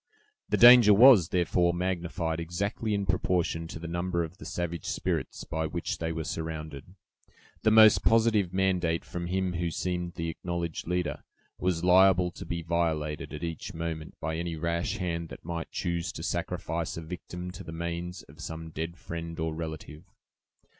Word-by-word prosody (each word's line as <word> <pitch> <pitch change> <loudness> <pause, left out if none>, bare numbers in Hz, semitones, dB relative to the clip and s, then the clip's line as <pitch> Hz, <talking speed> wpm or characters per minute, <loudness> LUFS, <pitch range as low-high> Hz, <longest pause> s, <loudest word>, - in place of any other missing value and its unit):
The - - +2
danger 120 -4 +9
was, 115 -6 +8
therefore, 85 -1 +2
magnified 85 -2 -2
exactly 100 +6 -2
in 100 -1 -1
proportion 90 -3 0
to 80 - -7
the 85 0 -7
number 85 0 -1
of 85 +3 -8
the - - -9
savage 85 -2 -4
spirits - - -2
by 80 0 -2
which 85 +2 -3
they 80 0 -2
were 80 0 -3
surrounded. 80 0 -6 0.7
The 110 - +4
most 110 -1 +7
positive 110 -5 +3
mandate 90 -3 +1
from 85 -1 -5
him 95 0 -1
who 85 0 -1
seemed 90 0 -3
the 85 -1 -3
acknowledged 85 -1 -4
leader, 90 0 -2 0.4
was 90 -2 0
liable 90 0 +5
to - - -9
be 85 -1 -3
violated 80 -2 -1
at 75 +2 -7
each 85 +3 -5
moment 80 -1 -5
by 80 0 -3
any 85 0 -3
rash 85 +2 -1
hand 85 -3 -3
that - - -11
might 85 -1 -4
choose 85 -2 -2
to - - -7
sacrifice 80 0 -3
a - - -4
victim 90 +1 -7
to - - -9
the - - -8
manes 85 +2 -4
of 75 +3 -15
some 80 0 -6
dead 80 +3 -5
friend 85 0 -6
or 80 0 -1
relative. 80 -1 -7
85 Hz, 170 wpm, -28 LUFS, 80-90 Hz, 0.7 s, danger